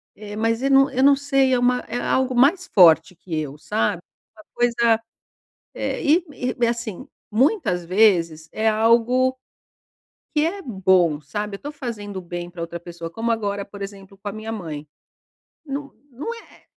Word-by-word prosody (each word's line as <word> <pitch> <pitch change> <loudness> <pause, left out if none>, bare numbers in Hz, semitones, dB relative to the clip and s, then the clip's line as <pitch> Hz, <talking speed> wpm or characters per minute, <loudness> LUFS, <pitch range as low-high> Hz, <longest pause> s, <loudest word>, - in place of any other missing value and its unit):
Eh, 205 -1 -9
mas 225 +1 0
eu 275 - +2
não 270 0 +6
eu 260 0 0
não 280 0 +7
sei 275 -2 +2
é 250 - +3
uma 250 0 +2
é 245 - -3
algo 260 +1 +1
mais 315 +10 +4
forte 165 -2 +6
que 170 -1 -6
eu, 145 -2 -5
sabe. 145 +2 -1 0.4
Uma 215 - -14
coisa, 235 -2 +2 0.7
é - - -3
e 325 +5 +4
e 250 -3 -3
é - - +2
assim, 235 -4 -4 0.2
muitas 225 - +2
vezes, 170 -5 +3
é 220 +1 -1
algo 235 +4 +3 1.0
que 300 0 +3
é 390 +4 -3
bom, 185 - +2
sabe. 205 +8 -4
Eu - - -23
tô 290 - -5
fazendo 220 -8 -6
o - - -4
bem 175 0 -6
pra 175 -1 -10
outra 170 +1 -5
pessoa, 170 -1 -8
como 225 +6 -2
agora 205 -3 -2
por 200 0 -12
exemplo 195 0 -9
com 205 - -6
a - - -5
minha 215 +1 -6
mãe. 160 -8 -6 0.8
Não 280 0 -5 0.2
não 280 - -5
é 460 - -16
220 Hz, 180 wpm, -22 LUFS, 180-255 Hz, 1.0 s, não